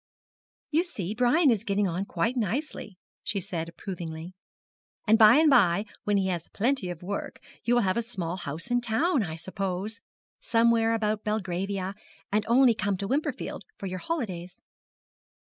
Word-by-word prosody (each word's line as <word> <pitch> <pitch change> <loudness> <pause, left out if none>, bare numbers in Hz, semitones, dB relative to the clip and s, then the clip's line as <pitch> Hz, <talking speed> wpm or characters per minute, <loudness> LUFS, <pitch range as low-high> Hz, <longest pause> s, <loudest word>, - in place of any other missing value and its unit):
'You 320 +2 +4
see 210 - -4
Brian 250 +6 +4
is 220 -3 0
getting 200 -2 +1
on 180 +3 -2
quite 190 +7 -1
nicely,' 225 - -3 0.2
she 200 - -2
said 170 -3 -4
approvingly, 170 -1 -7 0.7
'and 220 0 +6
by 215 -1 +9
and 315 +1 +5
by 205 - +5 0.2
when 205 -1 +2
he 195 - +1
has 175 -3 -3
plenty 235 -3 0
of 175 -1 -7
work, 200 +3 -4 0.2
you 240 +3 +2
will 240 - +3
have 185 +2 +1
a - - +2
small 185 -7 -4
house 165 - -6
in 245 0 +3
town, 255 +6 +1
I 160 -6 -3
suppose 190 +5 -4 0.4
somewhere 230 0 +3
about 215 -1 -1
Belgravia 195 -2 -2 0.4
and 210 +1 +2
only 245 +1 +6
come 205 -3 -1
to 200 +1 -3
Wimperfield 280 -1 -2 0.2
for - - -7
your 185 -1 -4
holidays.' 185 - -4
205 Hz, 160 wpm, -27 LUFS, 185-235 Hz, 0.7 s, by